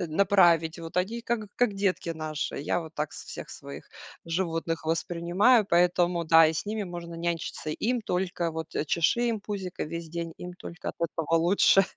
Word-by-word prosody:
э, 175 - -1
направить. 170 -2 +4
Вот 165 +1 -8
они 215 +6 0
как 230 -3 -2
как 245 -4 +2
детки 195 -3 0
наши. 155 -2 -3
Я 150 +5 0
вот 160 -1 -10
так 150 -1 -3
с - - -9
всех - - -8
своих 70 +2 -10 0.4
животных 165 -1 -2
воспринимаю, 175 +8 +3
поэтому 175 0 +3
да, 160 0 +7
и 155 - +1
с 160 - -3
ними 215 +1 -2
можно 175 -1 -7
нянчиться. 165 -2 -3
Им 240 +9 0
только 180 -4 -1
вот, 160 0 -6
э, - - 0
чеши 170 +10 +2
им 220 -3 -1
пузико 195 -3 -5
весь 170 +1 -6
день, 170 0 -4
им 180 0 -7
только 175 -1 -6
от - - -21
этого 165 -1 -1
лучше. 190 +3 +5
170 Hz, 185 wpm, -28 LUFS, 165-190 Hz, 0.4 s, да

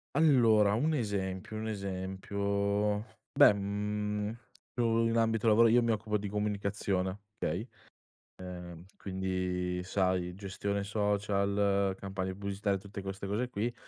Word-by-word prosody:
Allora, 115 -9 +5
un 150 +8 +1
esempio, 100 -4 -3
un 110 +1 -3
esempio. 100 +1 -1 0.3
Beh, 105 - +8
mhmm, 105 +1 -2 0.4
io 115 -1 +3
in 115 - 0
ambito 115 0 +2
lavora 115 +2 +6
io 120 +2 +5
mi 115 - +2
occupo 105 0 0
di 105 - -4
comunicazione, 100 -2 -1 0.2
okay; 95 +10 -2 0.7
ehm, 90 -1 -8
quindi 90 -1 -2
sai 90 -2 0
gestione 100 +1 -3
social, 100 -1 +1
campagne 95 -1 -4
pubblicitarie 100 +1 -1
tutte 100 +1 -8
queste 95 0 -5
cose 110 +6 -1
qui, 115 +2 -2
100 Hz, 120 wpm, -31 LUFS, 95-105 Hz, 0.7 s, Beh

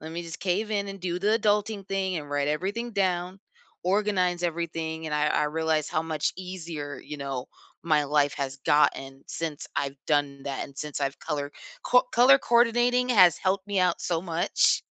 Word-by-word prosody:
Let 160 +1 -8
me 170 +1 -4
just 165 -2 -8
cave 200 +4 -1
in 200 -1 0
and 195 0 -8
do 175 -1 -2
the 210 +4 +2
adulting 210 -2 0
thing 190 -2 -1
and 145 -2 -6
write 145 0 0
everything 200 +10 -2
down, 185 -1 -1 0.4
organize 185 -2 +1
everything," 165 -1 -3
and 150 - -2
I 150 0 +2
I - - +1
realized 155 0 0
how 155 - 0
much 155 -2 -1
easier, 165 -7 -6
you 150 - -7
know, 135 -2 -4 0.4
my 155 -3 +3
life 145 0 +2
has 140 0 -4
gotten 135 -2 +2
since 160 -3 -5
I've 140 -1 -2
done 145 -2 0
that 140 -1 -3
and 140 - -14
since 150 -1 -4
I've 140 0 -2
color 145 -1 -3 0.3
co 250 0 +5
Color 255 +3 +7
coordinating 240 +1 +3
has 185 -8 +6
helped 190 +1 0
me 200 -1 -1
out 180 -2 +1
so 170 -2 -1
much. 170 -2 +2
170 Hz, 185 wpm, -27 LUFS, 150-195 Hz, 0.4 s, Color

